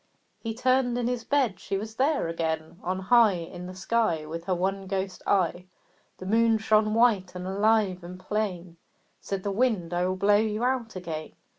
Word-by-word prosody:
He 225 -1 -4
turned 255 0 +2
in 245 - -1
his 245 -2 -2
bed; 250 -9 +1
she 195 - -3
was 215 +2 -6
there 270 - +1
again! 160 0 -3
On 185 +1 -2
high 220 +2 +5
In 175 +1 -7
the 185 - -8
sky 190 -5 0
With 165 +2 -6
her 185 - 0
one 195 +2 -2
ghost 190 -1 -3
eye, 180 -2 +1 0.5
The 185 - -9
Moon 225 +2 +3
shone 215 0 +2
white 210 -6 +3
and 180 0 -5
alive 200 -1 +1
and 180 +1 -9
plain. 185 -5 -3 0.4
Said 195 -1 -4
the 200 - -1
Wind 200 -6 0
"I 175 +1 +1
will 185 - -1
blow 200 +2 +4
you 215 +1 0
out 250 -4 -1
again." 165 -4 -6
195 Hz, 185 wpm, -27 LUFS, 180-225 Hz, 0.5 s, high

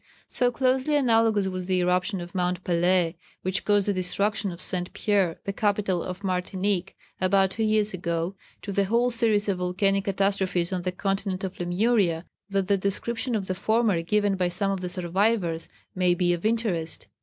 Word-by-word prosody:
So 245 -1 +1
closely 260 +3 +1
analogous 225 -6 +3
was 185 -1 -4
the 185 -1 +1
eruption 180 +2 +1
of 175 0 -9
Mount 180 0 -1
Pelée, 175 -1 +2 0.3
which 185 +1 0
caused 205 -1 +2
the 205 - +2
destruction 200 +2 0
of 170 - -9
St. 180 -1 -2
Pièrre, 195 -6 +1
the 200 - -3
capital 200 -4 0
of 185 +3 -6
Martinique, 190 0 -1 0.2
about 190 0 +3
two 225 - -4
years 215 -1 +2
ago, 170 0 -2 0.3
to 200 - -4
the 200 0 +1
whole 235 +4 +2
series 225 -3 +1
of 190 -3 0
volcanic 195 +2 +1
catastrophes 195 -3 0
on 180 - -1
the 180 +1 -2
continent 195 0 -2
of 190 -1 -5
Lemuria, 175 -1 +1 0.2
that 195 -1 0
the 200 -1 +3
description 230 +5 -1
of 200 -3 -1
the 185 - -2
former 215 -1 +1
given 205 +3 +1
by 180 -1 +1
some 195 +3 -1
of 195 -2 -2
the 180 - -3
survivors 180 -1 0 0.2
may 180 -1 +2
be 175 0 +2
of 175 +4 -1
interest. 215 -8 -1
190 Hz, 180 wpm, -26 LUFS, 180-210 Hz, 0.3 s, analogous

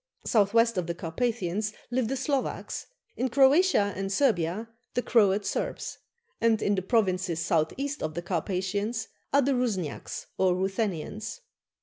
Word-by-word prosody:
South 205 -3 +3
west 230 -2 +3
of 175 - -3
the 170 - -2
Carpathians 205 +3 -1 0.2
live 245 -2 +1
the 270 - -1
Slovaks; 275 0 -2 0.3
in 255 +1 0
Croatia 270 - +4
and 195 0 -3
Servia 205 - +1 0.3
the 245 - +1
Croat 205 -3 +3
Serbs; - - -3 0.4
and 230 -1 +4
in 205 - +1
the 190 - 0
provinces 185 -5 +1
south 165 -2 +1
east 285 +2 -3
of 155 0 -3
the 175 - -3
Carpathians 195 +5 -2 0.2
are 280 0 +4
the 275 +2 +2
Rusniaks 210 - -2
or 185 -1 +4
Ruthenians. 195 - -2
205 Hz, 145 wpm, -28 LUFS, 185-240 Hz, 0.4 s, Croatia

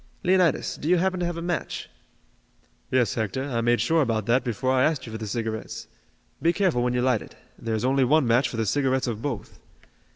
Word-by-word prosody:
Leonidas, 180 -4 +2
do 150 - -3
you 180 - +5
happen 185 +1 0
to 175 - 0
have 175 -1 -3
a 170 - -4
match?" 175 0 -3 1.0
"Yes, 125 -3 +2
Hector, 110 +3 -2
I 125 -4 -2
made 120 +1 +2
sure 165 0 +2
about 115 -6 0
that 120 +3 +2
before 125 +2 -1
I 130 -1 +3
asked 150 -4 +1
you 115 - -8
for 110 - -6
the 110 - -5
cigarettes. 110 0 -4 0.6
Be 165 +3 +3
careful 175 -9 +1
when 125 0 +1
you 125 - +1
light 125 -4 +2
it. - - -12 0.2
There 115 -1 -2
is 110 - -1
only 135 +1 +3
one 145 +3 +3
match 120 +3 +3
for 115 - -6
the 110 - 0
cigarettes 130 +3 +1
of 115 -3 -3
both." 125 -7 -5
130 Hz, 225 wpm, -25 LUFS, 115-155 Hz, 1.0 s, you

